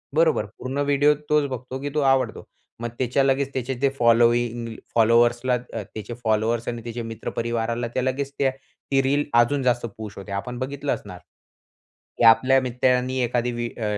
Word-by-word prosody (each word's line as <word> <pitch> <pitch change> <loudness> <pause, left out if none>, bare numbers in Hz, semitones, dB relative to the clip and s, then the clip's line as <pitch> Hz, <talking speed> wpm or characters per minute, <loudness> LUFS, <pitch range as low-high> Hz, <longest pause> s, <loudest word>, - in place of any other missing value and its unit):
बरोबर, 160 -9 +3
पूर्ण 130 +2 -5
व्हिडिओ 145 +1 +4 0.2
तोच 150 -1 +3
बघतो, 130 +1 -6
की 145 - -3
तो - - +2
आवडतो. 130 -4 0 0.4
मग 120 - -2
त्याच्या 130 +2 +2
लगेच 135 0 +1
त्याचे 130 0 -2
जे 140 0 +3
फॉलोइंग 120 0 +2 0.2
फॉलोवर्सला 120 +2 +4
अ, 120 -2 -4
त्याचे 110 +2 -6
फॉलोवर्स 110 +1 0
आणि 120 -1 -3
त्याचे 120 0 -5
मित्रपरिवाराला 115 +1 -2
त्या 130 - 0
लगेच 135 +1 -2
त्या 135 -1 +3
ती 135 0 -2
रील 140 +2 +1 0.2
अजून 135 +3 0
जास्त 120 -1 +1
पुश 105 -3 -8
होते. 100 0 -9
आपण 120 +5 -4
बघितलं 135 +2 -2
असणार, - - -10 1.0
की - - 0
आपल्या 130 +4 +6
मित्रांनी 125 +1 +1
एखादी 120 0 0
व्हि 120 0 -3
अ, 115 - -5
125 Hz, 165 wpm, -24 LUFS, 115-135 Hz, 1.0 s, आपल्या